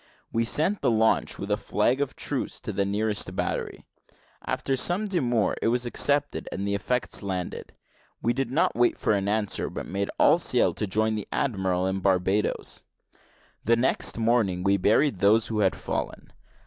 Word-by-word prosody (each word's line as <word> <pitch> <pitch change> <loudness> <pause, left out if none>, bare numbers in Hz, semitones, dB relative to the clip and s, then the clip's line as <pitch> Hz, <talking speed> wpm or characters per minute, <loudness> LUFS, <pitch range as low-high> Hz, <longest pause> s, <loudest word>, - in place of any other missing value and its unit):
We 115 0 +1
sent 160 - +1
the - - +2
launch 110 -1 +2
with 100 +1 -5
a 105 - +2
flag 105 +6 0
of 145 - -2
truce - - -3
to - - -5
the 100 - 0
nearest 105 -2 -1
battery; 100 - -3 0.6
after 135 - -1
some 175 +10 +1
demur 120 - 0
it - - +1
was 120 +2 +1
accepted, 145 +4 0
and 100 +1 -3
the 100 - -1
effects 120 +5 -1
landed. 95 -3 -5 0.5
We 120 - 0
did 135 -1 -2
not 135 +6 +1
wait 120 +1 +2
for - - +1
an 100 -1 -1
answer, 105 0 0
but - - -6
made 100 +1 -3
all - - +5
sail - - +2
to 105 - -3
join 110 +3 +1
the 105 -2 -4
admiral 95 -7 0
at 95 0 -2
Barbadoes. 95 +2 0 0.8
The 115 - +3
next 120 0 +1
morning 110 -6 +1
we 100 0 +3
buried 105 +4 +2
those 110 +3 +3
who 110 -2 -2
had 95 -3 +2
fallen. - - -5
110 Hz, 175 wpm, -26 LUFS, 100-120 Hz, 0.8 s, all